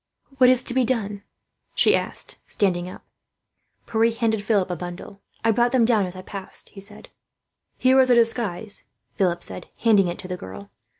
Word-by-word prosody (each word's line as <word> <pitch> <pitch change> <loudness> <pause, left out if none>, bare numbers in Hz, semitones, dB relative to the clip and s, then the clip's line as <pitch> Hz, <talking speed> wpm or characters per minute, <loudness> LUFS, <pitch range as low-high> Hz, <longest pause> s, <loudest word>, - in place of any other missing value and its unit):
"What 250 -1 +7
is 255 -1 +5
to 245 - -3
be 260 0 +3
done?" 210 -5 -1 0.5
she - - +4
asked, - - -4
standing 180 -3 0
up. - - -12 0.8
Pierre 225 +1 +2
handed 225 -2 0
Philip 200 -3 +1
a - - -1
bundle. 180 +3 -8 0.2
"I 225 - +5
brought 240 +3 +2
them 245 -3 +4
down 220 -5 +3
as 180 - -8
I 185 - -8
passed," 195 -1 -7
he 195 - -11
said. 205 +1 -6 0.7
"This 255 0 +6
is 260 -1 +5
a 245 - +6
disguise," 225 -4 0 0.3
Philip 175 -3 0
said, 90 -1 -4
handing 210 -5 +4
it 175 - -3
to - - -8
the 180 - -3
girl. 100 - -10
205 Hz, 185 wpm, -23 LUFS, 185-235 Hz, 0.8 s, What